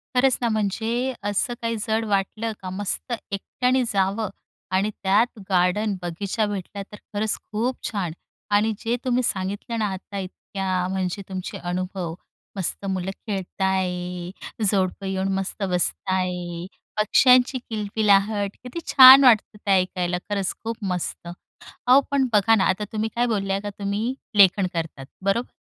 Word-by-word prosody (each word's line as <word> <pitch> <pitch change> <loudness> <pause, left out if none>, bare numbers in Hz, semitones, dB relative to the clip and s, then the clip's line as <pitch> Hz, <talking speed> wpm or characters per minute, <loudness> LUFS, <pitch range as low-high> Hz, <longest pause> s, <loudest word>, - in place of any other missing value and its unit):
खरंच 255 0 +4
ना, 235 - +1
म्हणजे 225 +4 -1
असं 205 +4 0
काही 230 0 -1
जड 220 +1 +1
वाटलं 210 +2 -1
का, 185 - -5
मस्त 200 +6 -3 0.2
एकट्याने 250 +6 0
जावं 195 +2 +1 0.4
आणि 190 +3 +2
त्यात 210 +4 +2
गार्डन, 190 +3 +2
बगीचा 195 +5 -2
भेटला, 200 0 -5
तर 205 - -13 0.2
खरंच 210 +1 +1 0.2
खूप 235 +4 0
छान. 195 -6 -2 0.4
आणि 215 +2 +3
जे 230 +1 -1
तुम्ही 250 0 +2
सांगितलं 200 +3 -2
ना 215 - +1
आता 195 +2 -8
इतक्या, 190 0 -3
अ, - - -1
म्हणजे 190 0 -2
तुमचे 185 -1 -5
अनुभव, 180 -1 -3 0.4
मस्त 195 +1 -2
मुलं 190 0 -2 0.2
खेळत 195 -2 -4
आहे, 180 -2 -1 0.4
जोडपं 195 -1 0
येऊन 190 0 -1
मस्त 195 +2 -3
बसत 180 +1 0
आहे, 180 -2 -2 0.3
पक्ष्यांची 250 +4 +5
किलकिलाहट, 205 -1 +2
किती 250 +7 -6
छान 265 0 +10
वाटतं 225 -3 +4
ते 200 - +2
ऐकायला, 180 -1 -1
खरंच 200 -2 -1
खूप 230 +1 -3 0.2
मस्त. 175 -1 -3 0.6
अहो, 255 +2 +7
पण 275 -2 +2
बघा 215 +1 +5
ना 195 - +3
आता, 195 +3 0
तुम्ही 220 0 -1
काय 240 - +2
बोलल्या 195 -4 -1
का, 205 - -5
तुम्ही 205 +5 -1 0.2
लेखन 195 -1 +6
करतात, 160 -5 -4 0.2
बरोबर? 230 +5 0
200 Hz, 145 wpm, -24 LUFS, 185-220 Hz, 0.6 s, छान